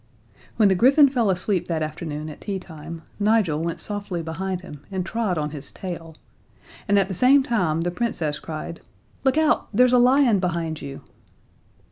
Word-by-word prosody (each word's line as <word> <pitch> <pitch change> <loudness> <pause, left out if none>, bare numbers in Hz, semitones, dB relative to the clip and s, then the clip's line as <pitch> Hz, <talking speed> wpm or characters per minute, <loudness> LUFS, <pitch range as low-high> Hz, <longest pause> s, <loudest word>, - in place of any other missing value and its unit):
When 215 -3 +5
the 195 - +4
griffin 270 - +6
fell 240 -6 +1
asleep 185 -1 0
that 160 -2 -1
afternoon 155 -1 -5
at - - -13
teatime, 165 -5 -7 0.2
Nigel 205 -7 +2
went 170 0 -3
softly 200 -5 -4
behind 180 +3 -3
him 150 -6 -11
and 185 -2 -2
trod 210 -3 -1
on 150 -1 -2
his 145 -2 -7
tail, 165 -4 -7 0.7
and 205 0 +3
at 195 -2 +3
the 190 - -4
same 265 +8 +5
time 180 -11 0
the 175 +1 -1
Princess 170 -8 -2
cried: 165 +1 -7 0.4
"Look 270 +2 +2
out! 315 -1 +2
There's 250 +3 +4
a 250 - +6
lion 250 -3 +5
behind 170 -3 -2
you." 140 -1 -7
185 Hz, 170 wpm, -23 LUFS, 160-225 Hz, 0.7 s, griffin